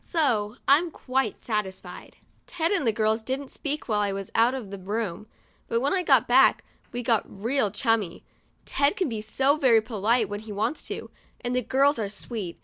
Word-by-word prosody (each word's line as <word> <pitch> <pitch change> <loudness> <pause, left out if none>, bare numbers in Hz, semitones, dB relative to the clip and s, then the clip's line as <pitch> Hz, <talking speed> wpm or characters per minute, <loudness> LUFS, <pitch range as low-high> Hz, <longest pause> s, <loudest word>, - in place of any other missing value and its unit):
So 235 - 0
I'm 310 +5 +5
quite 265 -3 -2
satisfied. 210 -4 -4 0.3
Ted 330 0 -1
and 345 - +1
the - - +5
girls 220 +1 +1
didn't 265 +4 -4
speak 295 +1 -3
while 215 -3 +1
I 205 -1 +1
was 195 -1 -5
out 235 +3 +3
of 225 -7 -7
the 200 - -6
room; 205 0 -4 0.4
but 230 - +1
when 275 +4 0
I 380 - +2
got - - +4
back, - - +5 0.3
we 245 - -3
all - - -9
got 220 -4 -1
real 245 -2 +2
chummy. 210 -3 0 0.4
Ted 285 +6 +1
can 370 -7 0
be 220 -2 -4
so 265 +7 +1
very 250 -6 +5
polite 220 +1 +1
when 205 +1 -5
he 215 0 -10
wants 210 +9 -1
to, - - -6 0.3
and 245 +1 -2
the 250 - +2
girls 270 +3 +2
are 205 -2 -2
sweet. 205 -3 -6
230 Hz, 200 wpm, -26 LUFS, 210-270 Hz, 0.4 s, I'm